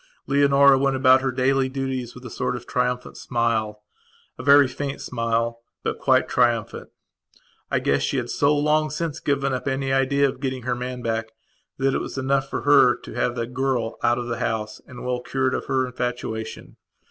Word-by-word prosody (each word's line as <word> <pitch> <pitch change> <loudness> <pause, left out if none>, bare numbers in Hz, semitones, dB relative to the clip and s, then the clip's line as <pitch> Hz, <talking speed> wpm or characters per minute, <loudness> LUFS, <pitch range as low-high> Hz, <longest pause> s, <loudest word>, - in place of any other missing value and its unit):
Leonora 140 -1 +5
went 135 0 +1
about 130 0 +5
her 135 0 0
daily 130 +1 +1
duties 130 -2 -4
with 125 +1 -12
a - - -6
sort 125 0 -2
of 120 -1 -8
triumphant 125 0 -2
smilea 115 -3 -1 0.6
very 140 +1 +6
faint 135 +2 -5
smile, 115 -1 -1 0.2
but - - -2
quite - - +3
triumphant. 115 -2 0 0.8
I - - +1
guess 70 0 +1
she 140 - -1
had 120 -2 -2
so 145 +1 +2
long 155 +1 +2
since 155 0 -3
given 140 -1 0
up 130 +2 -3
any 135 0 -1
idea 140 +1 +3
of 130 - -5
getting 130 -2 -3
her 125 +1 -1
man 125 0 -5
back 110 -1 -2 0.4
that 135 0 +1
it - - 0
was - - -6
enough 135 +1 0
for - - -3
her 140 -4 +6
to - - -11
have 120 +1 -1
got 120 - -2
the - - -1
girl 125 -2 -2
out 120 0 +2
of 120 - -3
the 120 -1 -4
house 105 -1 -3
and 125 -1 -9
well 125 -1 -1
cured 130 +1 -1
of - - -3
her 130 -1 +1
infatuation. 125 -3 -5
130 Hz, 195 wpm, -23 LUFS, 120-135 Hz, 0.8 s, very